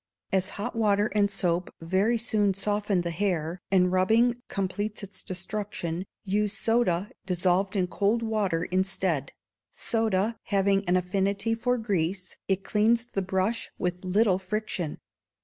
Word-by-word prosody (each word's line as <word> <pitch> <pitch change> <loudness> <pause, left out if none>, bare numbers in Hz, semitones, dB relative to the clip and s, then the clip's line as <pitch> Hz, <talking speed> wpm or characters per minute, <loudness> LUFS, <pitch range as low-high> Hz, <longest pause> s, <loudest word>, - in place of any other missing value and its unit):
As 190 0 +2
hot 205 - -3
water 210 -2 +2
and 205 -1 +3
soap 180 -3 0
very 190 +8 +2
soon 210 -4 +1
soften 205 -1 0
the 170 0 -3
hair, 175 -2 -1
and 180 -2 +4
rubbing 230 +6 +3
completes 205 +2 -3
its 200 -1 -8
destruction, 185 -2 -4 0.2
use 210 +1 0
soda, 225 -4 +1 0.2
dissolved 185 +2 +1
in 185 -2 +2
cold 205 +6 +1
water, 205 -7 0
instead; 185 -6 0 0.4
soda 225 -1 0
having 195 0 +2
an 180 - +4
affinity 195 +4 0
for 245 +2 +1
grease, 190 -4 -2
it 195 0 0
cleans 230 +3 +2
the 195 - +1
brush 190 +4 -1
with 180 0 -2
little 190 +1 +3
friction. 190 -4 -3
195 Hz, 135 wpm, -27 LUFS, 185-215 Hz, 0.4 s, and